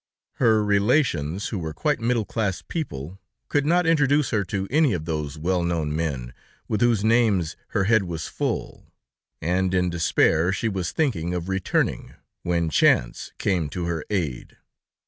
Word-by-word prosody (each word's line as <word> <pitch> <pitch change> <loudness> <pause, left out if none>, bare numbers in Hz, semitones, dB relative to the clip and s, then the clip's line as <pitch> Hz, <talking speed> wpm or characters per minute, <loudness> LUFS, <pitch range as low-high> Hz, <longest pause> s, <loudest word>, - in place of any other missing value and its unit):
Her 110 -3 +3
relations, 100 - +1
who 105 - -3
were 80 -2 -5
quite 150 -1 0
middle 115 -1 0
class 100 -5 -2
people, 95 - -5 0.3
could 145 0 +1
not 175 +2 +3
introduce 145 -3 +3
her 110 -3 +1
to 95 +2 -3
any 150 -3 +3
of 80 -3 -3
those 75 -2 -3
well 90 +3 0
known 80 -3 -1
men 70 -7 -3 0.3
with 105 - -1
whose 120 -4 +3
names 110 -7 +2
her 95 - 0
head 110 0 +3
was 80 -2 -4
full, - - -4 0.6
and 90 +3 +1
in 90 -1 +1
despair 85 0 +2
she 105 +4 -1
was 95 -4 -3
thinking 90 - -1
of 90 +1 -4
returning, 95 -1 -1 0.3
when 85 -2 0
chance - - +2
came 90 -7 0
to 85 +4 -4
her 85 -3 -2
aid. 80 -12 -3
95 Hz, 160 wpm, -24 LUFS, 80-115 Hz, 0.6 s, Her